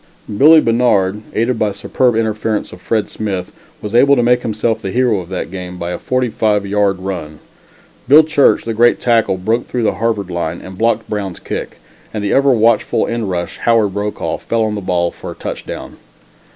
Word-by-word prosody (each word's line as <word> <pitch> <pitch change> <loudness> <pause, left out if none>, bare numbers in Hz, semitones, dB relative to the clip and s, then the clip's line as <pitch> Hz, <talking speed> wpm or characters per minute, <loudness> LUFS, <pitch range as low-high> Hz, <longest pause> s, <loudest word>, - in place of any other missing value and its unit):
Billie 155 +7 +7
Bannard, 105 -5 +1
aided 115 +1 0
by 105 -1 +1
superb 120 +4 0
interference 110 -1 -1
of 90 - -12
Fred 110 +1 -1
Smith, 95 -4 -4 0.3
was 105 0 -5
able 140 +4 +5
to 120 - +2
make 125 +1 +3
himself 110 0 -1
the 95 - -4
hero 120 -1 +1
of 90 -1 -9
that 90 -2 -4
game 90 -1 -7
by 85 0 -4
a 90 - -4
forty 130 -1 0
five 105 -2 0
yard 100 -1 +1
run. 90 -5 -6 0.7
Bill 150 +5 +8
Church 155 -2 +3
the 115 - -3
great 120 +2 +3
tackle 115 -5 +2
broke 110 +6 -1
through 125 -2 -2
the - - +2
Harvard 105 -5 -1
line 85 -1 -3
and 95 0 -10
blocked 115 +2 0
Brown's 100 -4 -4
kick, - - -6 0.3
and 105 -2 -4
the 100 - 0
ever 140 +1 +4
watchful 115 -3 +2
end 115 -3 -3
rush, 85 -1 -4
Howard 115 -4 +2
Brokaw, 105 +1 -3
fell 115 -1 -1
on 110 -1 -1
the 105 - -4
ball 90 -2 0
for - - -9
a - - -7
touchdown. - - -7
110 Hz, 195 wpm, -16 LUFS, 95-115 Hz, 0.7 s, Bill